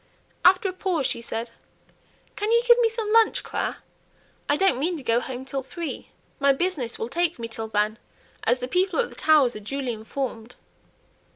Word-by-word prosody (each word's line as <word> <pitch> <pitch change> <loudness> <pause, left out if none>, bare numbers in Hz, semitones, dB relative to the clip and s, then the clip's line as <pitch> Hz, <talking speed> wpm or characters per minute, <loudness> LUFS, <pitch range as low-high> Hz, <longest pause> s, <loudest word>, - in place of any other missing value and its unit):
After 370 +2 +5
a 370 - -3
pause 360 -6 -1
she 235 - -1
said, 230 0 -5 0.8
"Can 420 +2 -1
you 470 +1 +4
give 480 0 +7
me 465 -1 +4
some 440 -1 -3
lunch, 455 -1 +4
Clare? - - -3 0.7
I 290 - +3
don't 385 -8 +3
mean 340 +4 0
to 285 - -9
go 230 -1 +2
home 255 +1 -6
till 270 0 -3
three. 330 +5 -6 0.3
My 280 0 +4
'business' 275 -6 -2
will 225 - -3
take 340 +5 0
me 230 -1 -5
till 225 -1 -6
then, 215 +1 0 0.4
as 245 - +3
the 250 - -2
people 365 +7 +1
at 485 - 0
the - - -12
Towers 295 -6 +4
are - - -5
duly 255 +3 -3
informed." 230 +1 -5
275 Hz, 190 wpm, -25 LUFS, 235-370 Hz, 0.8 s, give